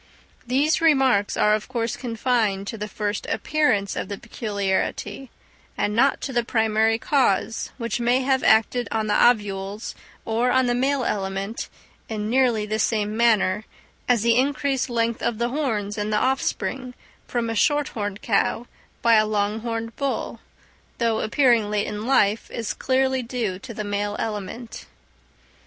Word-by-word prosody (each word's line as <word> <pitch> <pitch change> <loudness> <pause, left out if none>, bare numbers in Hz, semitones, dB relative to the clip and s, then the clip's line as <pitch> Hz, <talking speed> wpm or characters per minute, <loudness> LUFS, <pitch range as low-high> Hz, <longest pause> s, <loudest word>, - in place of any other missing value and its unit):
These 285 +7 +2
remarks 265 -10 +3
are 210 - +4
of 215 0 -1
course 230 -1 -2
confined 225 -5 0
to 225 - -5
the 210 -1 -5
first 210 -1 -3
appearance 255 -11 +1
of - - -3
the 200 - -4
peculiarity, 205 +2 -3 0.5
and 210 - 0
not 270 +4 +3
to 270 - -4
the 240 -1 +2
primary 220 -1 +2
cause 235 -5 +1
which 235 -1 -2
may 245 +2 +2
have 265 0 +1
acted 225 +3 +3
on 220 -1 -1
the 210 - 0
ovules 205 -2 -1 0.3
or 230 +3 +1
on 260 0 +3
the 245 - +1
male 265 +2 +1
element; 195 +1 -3 0.4
in 215 -1 -3
nearly 245 -4 +2
the 215 +1 -2
same 210 -1 0
manner 220 -3 +2 0.4
as 240 -3 +3
the 235 0 +4
increased 270 0 0
length 235 -1 0
of 235 -2 -1
the 235 +1 0
horns 220 -7 -2
in 205 +1 -2
the 210 - +1
offspring 260 0 -1 0.3
from 240 -1 -1
a 225 - -2
short 290 +6 +2
horned 205 -2 -5
cow 230 +2 +1 0.4
by 235 - +5
a 215 0 +3
long 210 0 0
horned 230 0 -4
bull, 280 -1 -2 0.6
though 230 -2 +1
appearing 235 -3 +3
late 210 -1 0
in 210 +2 -5
life, 215 -5 +2
is 230 -3 -3
clearly 265 0 +1
due 230 -6 -3
to 235 - -9
the 215 -1 -5
male 205 0 -2
element. 220 +2 -5
225 Hz, 160 wpm, -23 LUFS, 210-250 Hz, 0.6 s, by